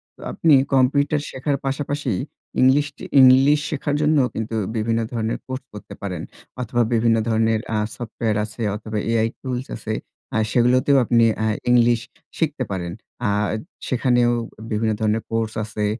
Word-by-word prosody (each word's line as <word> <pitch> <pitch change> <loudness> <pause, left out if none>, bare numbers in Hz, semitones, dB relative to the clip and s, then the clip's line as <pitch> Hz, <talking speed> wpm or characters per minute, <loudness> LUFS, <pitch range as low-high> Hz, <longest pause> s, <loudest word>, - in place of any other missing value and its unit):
তো - - -18
আপনি 160 -2 +3 0.2
কম্পিউটার 140 +3 +3
শেখার 140 +2 -1
পাশাপাশি 140 -1 -2 0.5
ইংলিশটি 145 +3 +2 0.2
ইংলিশ 135 +3 +6
শেখার 145 0 -2
জন্য 150 +1 +3 0.2
কিন্তু 110 0 -4 0.2
বিভিন্ন 115 +1 0
ধরনের 115 -1 -2
কোর্স 130 0 -5
করতে 105 - -10
পারেন। 95 -3 -4 0.4
অথবা, 120 0 0
বিভিন্ন 115 0 +3
ধরনের 110 0 +2 0.2
আ - - +1 0.2
সফটওয়্যার 115 -2 -2
আছে 110 +2 -10
অথবা, 110 0 -5
AI 115 -1 +2
টুলস 130 -1 -4
আছে। 110 -1 -4 0.4
আ - - +3
সেগুলোতেও 130 +3 +4
আপনি 115 0 +4 0.2
আ - - +2 0.2
ইংলিশ 120 -1 +4 0.4
শিখতে 150 -5 0
পারেন। 90 -3 -3 0.4
আ - - +2 0.6
সেখানেও 120 -1 +2 0.4
বিভিন্ন 110 +1 +1
ধরনের 110 +1 +1
কোর্স 115 -1 -1
আছে। 105 -1 -3
120 Hz, 145 wpm, -22 LUFS, 110-135 Hz, 0.6 s, ইংলিশ